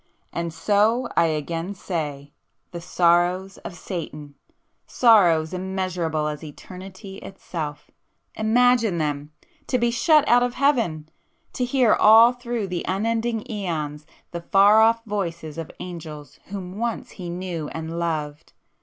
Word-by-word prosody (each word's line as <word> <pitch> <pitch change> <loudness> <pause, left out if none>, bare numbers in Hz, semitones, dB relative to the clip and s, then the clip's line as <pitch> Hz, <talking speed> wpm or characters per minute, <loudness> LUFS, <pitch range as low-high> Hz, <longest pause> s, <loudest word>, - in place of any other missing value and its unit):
"And 170 0 -3
so 210 +8 +2
I 170 - +4
again 165 +5 -3
say—the 155 0 -7
sorrows 175 +2 +1
of 175 - -8
Satan! 150 -5 -7 0.5
Sorrows 180 -9 +4
immeasurable 180 -4 -2
as 150 +1 -5
eternity 185 +5 -10
itself,—imagine 215 +7 -1
them! 150 -1 -3 0.4
To 255 - +1
be 240 -1 +1
shut 300 +5 +4
out 245 +1 +5
of 245 0 -1
Heaven!—to 225 - -2
hear 245 -3 +3
all 225 +3 +7
through 240 -3 -4
the 180 -2 -4
unending 225 +4 -1
æons, 155 -8 -4 0.3
the 170 - -5
far 200 +5 +5
off 230 +1 +3
voices 170 -7 -4
of 165 - -6
angels 155 -4 -9
whom 190 0 -7
once 235 -1 -3
he 180 -3 -8
knew 175 -3 -4
and 160 +2 -5
loved! 155 -3 -4
180 Hz, 120 wpm, -23 LUFS, 160-220 Hz, 0.5 s, all